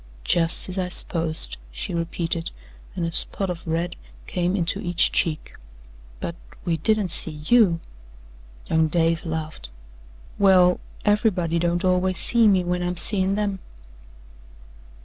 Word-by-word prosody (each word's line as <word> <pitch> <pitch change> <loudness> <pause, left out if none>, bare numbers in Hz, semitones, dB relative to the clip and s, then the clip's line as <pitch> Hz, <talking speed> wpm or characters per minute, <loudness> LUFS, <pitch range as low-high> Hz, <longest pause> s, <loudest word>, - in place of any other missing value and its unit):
"Jus' 165 - +3
as 185 +1 -5
I 180 -1 -2
s'posed," 165 -2 -1
she - - -6
repeated, 170 0 -3 0.5
and 175 -3 -2
a 165 - -3
spot 190 +3 +1
of 170 -1 -9
red 170 +2 -2 0.3
came 180 +1 -2
into 175 -3 -1
each 175 -1 +2
cheek. 155 -2 -1 0.7
"But 170 - -5 0.3
we 170 -2 0
didn't 210 +3 +1
see 155 -2 -2
YOU." 210 -8 +3 0.9
Young 160 0 +1
Dave 165 +1 0
laughed. 155 - -6 0.7
"Well, 185 -2 +4 0.3
everybody 195 -6 +1
don't 175 +1 -1
always 185 0 +1
see 235 -2 +5
me 190 -3 +3
when 180 0 -2
I'm 180 0 -3
seein' 195 +1 +5
them." 200 -2 -2
175 Hz, 130 wpm, -23 LUFS, 165-190 Hz, 0.9 s, see